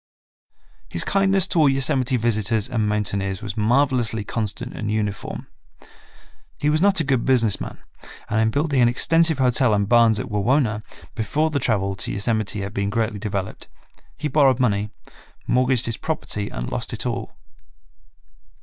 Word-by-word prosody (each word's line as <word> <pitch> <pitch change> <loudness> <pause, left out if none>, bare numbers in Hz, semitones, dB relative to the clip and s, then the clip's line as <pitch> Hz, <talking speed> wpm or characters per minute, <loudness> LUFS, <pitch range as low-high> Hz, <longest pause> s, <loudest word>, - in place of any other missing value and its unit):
His - - -2
kindness 195 -1 +2
to 170 - +2
all 150 -3 +5
Yosemite 130 -1 +1
visitors 110 -2 0
and 115 -5 -1
mountaineers 100 -1 -2
was 105 -2 -5
marvelously 120 -1 +1
constant 105 -1 -4
and 110 - -4
uniform. 105 -2 -3 1.1
He 150 - +1
was 155 +1 +1
not 195 -1 +3
a - - +2
good 135 -4 0
business 115 -6 +2
man, - - -6 0.5
and 110 +1 0
in 110 - +2
building 140 +1 0
an 120 - +5
extensive 165 +6 +3
hotel 125 -3 +3
and 100 -1 0
barns 115 -2 +4
at - - -3
Wawona, 110 +1 +1 0.3
before 145 +9 -1
the 145 - 0
travel 100 -6 0
to - - -3
Yosemite 105 0 -1
had 100 +1 -5
been 100 -1 -1
greatly 110 0 -2
developed, 100 -2 -5 0.5
he 150 - -2
borrowed 135 -3 +3
money, 105 -4 +1 0.6
mortgaged 125 -1 +2
his 115 - -2
property 105 -10 -3
and - - -5
lost - - -2
it - - -4
all. - - -4
115 Hz, 160 wpm, -22 LUFS, 105-135 Hz, 1.1 s, all